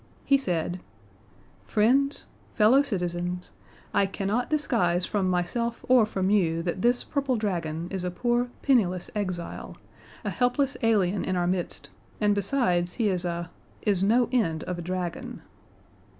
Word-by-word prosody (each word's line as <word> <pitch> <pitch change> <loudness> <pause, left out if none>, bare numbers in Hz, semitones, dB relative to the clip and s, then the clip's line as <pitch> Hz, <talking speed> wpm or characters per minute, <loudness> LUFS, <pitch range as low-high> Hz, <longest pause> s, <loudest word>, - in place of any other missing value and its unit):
He 275 - +5
said: 180 -8 -1 0.9
"Friends 270 +7 +2 0.3
fellow 235 +5 +6
citizens 180 -6 -3 0.4
I 195 - +3
cannot 205 +5 -1
disguise 205 - +1
from 195 -3 0
myself 230 +7 -1
or 250 -4 +5
from 190 -2 0
you 165 -5 +2
that 180 +2 -2
this 245 +2 +2
purple 275 -3 -1
dragon 170 -6 -2
is 190 -2 -3
a 180 - -1
poor 240 +6 0
penniless 190 -10 +2
exile, 185 -4 -4 0.5
a - - -1
helpless 255 +3 +1
alien 205 -4 +2
in 185 - -1
our 175 -1 +1
midst, 180 0 -2 0.3
and, 210 -1 +3
besides, 185 -5 +1
he 225 -4 +1
is 180 -2 -1
a 170 0 -3 0.3
is 195 -3 +2
no 235 +4 +4
end 165 -11 +1
of 180 -1 -4
a - - -3
dragon." 180 0 -4
195 Hz, 145 wpm, -27 LUFS, 175-240 Hz, 0.9 s, fellow